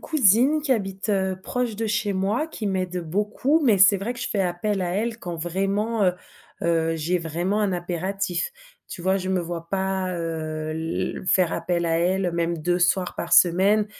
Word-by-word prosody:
cousine 275 - +3
qui 280 -3 +2
habite, 195 -2 -2
heu, 190 -2 0
proche 245 -4 -2
de 225 +1 -2
chez 215 -1 0
moi, 200 +10 0
qui 235 -9 -5
m'aide 185 -2 -1
beaucoup, 210 - +1
mais 215 -6 +4
c'est 200 +1 +7
vrai 210 +6 -3
que - - -10
je - - -2
fais 205 - -1
appel 185 +3 -1
à 180 -1 -1
elle 225 +3 -2
quand, 175 -5 -5
vraiment, 195 +6 -1
heu 180 -1 +3 0.5
heu, 165 -1 +1
j'ai 170 +3 0
vraiment 175 +5 -1
un 205 -2 +1
impératif. 180 - -2 0.4
Tu - - -8
vois, 190 +2 +2
je 185 -1 -4
me 190 - +1
vois 170 -1 -6
pas, 190 0 -1
heu, 155 -2 -4
l 160 +3 -3
faire 185 -2 +3
appel 170 -1 -1
à 165 0 +1
elle, 180 +1 +1
même 170 0 -1
2 175 +3 0
soirs 180 +1 +1
par 170 - -5
semaine, 195 +5 +5
190 Hz, 195 wpm, -24 LUFS, 175-205 Hz, 0.5 s, c'est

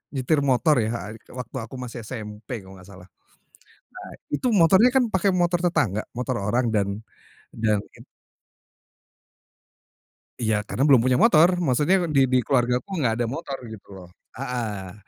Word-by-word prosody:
nyetir 135 +3 +1
motor 135 +1 +3
ya, 110 -1 -3 0.2
waktu 125 -2 -8
aku 115 +3 -8
masih 120 -3 -7
SMP 110 -1 -7
kalo 95 0 -14
nggak 90 - -15
salah. 90 -2 -14 1.0
Nah - - -11 0.2
itu 195 - 0
motornya 190 +6 +6
kan 245 -4 +3
pakai 190 +1 +1
motor 175 0 +1
tetangga, 115 - 0
motor 125 0 -2
orang 115 +3 0
dan, 100 0 -1 0.5
dalin 110 -2 +1 2.6
Iya 110 -3 0
karena 135 - 0
belum 135 -5 +6
punya 125 0 +2
motor, 175 -7 +6
maksudnya 150 +3 +2 0.2
di 135 -2 +4
di 130 - +3
keluarga 125 -2 +2
aku 195 +10 -9
nggak 115 -3 +1
ada 120 - 0
motor 135 +2 -5 0.2
gitu 100 - -13
loh, 90 -2 -12 0.3
heeh, 115 -8 -4
125 Hz, 145 wpm, -24 LUFS, 110-145 Hz, 2.6 s, motornya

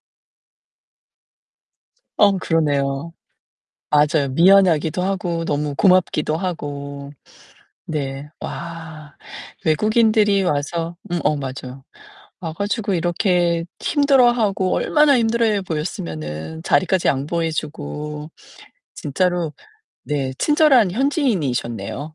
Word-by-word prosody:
아. - - -74 2.1
어, 205 -1 +5
그러네요. 145 -3 0 0.8
맞아요. 150 -1 +3
미안하기도 170 0 +4
하고 180 -3 -2
너무 150 -2 -2
고맙기도 175 -4 +2
하고. 140 -5 -5 0.8
네. 140 -2 -4
와. 160 -3 -8 0.5
외국인들이 210 +3 +3
와서 165 +2 -2
음 175 - 0
어 150 - +2
맞아요. 135 -1 -7 0.6
와 165 -5 -5
가지고 200 +3 -2
이렇게 175 -1 +1
힘들어하고 240 -9 +2
얼마나 300 -3 +3
힘들어해 225 -2 +1
보였으면은 85 - -5
자리까지 185 0 +2
양보해 160 +4 -1
주고. 150 - -5 0.7
진짜로 175 +2 -1 0.5
네, 140 -3 -2
친절한 290 - +4
현지인이셨네요. 155 - -1
165 Hz, 230 characters per minute, -20 LUFS, 145-195 Hz, 2.1 s, 어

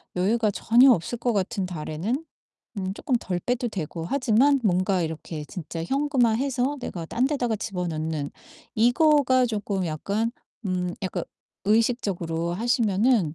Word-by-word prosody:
여유가 215 +4 +2
전혀 245 +6 +5
없을 230 +4 0
것 240 0 0
같은 200 0 -1
달에는 180 - -3 0.6
음 190 0 -3
쪼끔 255 - -2
덜 180 -2 -2
빼도 245 +4 -1
되고 165 -4 -5
하지만 265 +4 +3
뭔가 185 -1 +2
이렇게 160 -1 -5
진짜 165 0 -6
현금화해서 270 - +1
내가 170 -8 -5
딴 250 +8 +1
데다가 245 -6 0
집어넣는 160 -7 -3 0.4
이거가 255 +2 +4
쪼끔 205 -4 -2
약간 200 +8 -1 0.4
음 180 -1 -1
약간 185 - -2 0.4
의식적으로 195 -7 +1
하시면은 220 - +2
210 Hz, 290 characters per minute, -25 LUFS, 175-245 Hz, 0.6 s, 전혀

